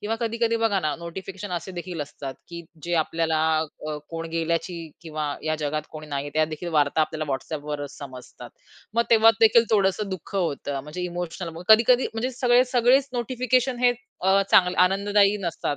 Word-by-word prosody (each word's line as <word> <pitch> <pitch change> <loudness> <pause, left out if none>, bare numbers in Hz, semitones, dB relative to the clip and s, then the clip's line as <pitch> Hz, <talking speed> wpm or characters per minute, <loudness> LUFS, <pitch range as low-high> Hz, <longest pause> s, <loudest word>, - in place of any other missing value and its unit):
किंवा 215 +2 -2
कधी-कधी 230 0 0
बघा 215 -3 +2
ना, 155 -3 -1
नोटिफिकेशन 190 +3 -7
असे 175 +2 -4
देखील 175 -1 -6
असतात, 140 -2 -6
की 170 0 -7 0.2
जे 175 0 -1
आपल्याला 160 -1 -1 0.4
क 155 0 -4
कोण 165 0 -5
गेल्याची 165 +2 -1 0.3
किंवा 155 -2 -4 0.2
या 155 0 0
जगात 150 +1 -1
कोणी 155 -1 -9
नाहीये, 145 -1 -4
त्या 155 0 +3
देखील 155 +3 -6
वार्ता 145 +2 +2
आपल्याला 155 -1 -2
WhatsAppवरच 145 +1 -5
समजतात. 130 -3 -10 0.4
मग 235 - +4
तेव्हा 225 -1 +7
देखील 230 +1 +6
थोडसं 200 -1 +2
दुःख 190 +1 -7
होतं. 145 -5 -2
म्हणजे 150 +5 -6
इमोशनल, 175 0 -4
मग 165 - -8
कधी-कधी 235 +3 +6
म्हणजे 235 +3 -1
सगळे 245 0 +5
सगळेच 255 +3 +4
नोटिफिकेशन 250 +1 0
हे 245 - +6 0.3
अ, 190 +1 +4
चांग 180 -1 +5
आनंददायी 200 +2 +3
नसतात. 170 -5 -2
175 Hz, 170 wpm, -24 LUFS, 155-220 Hz, 0.4 s, तेव्हा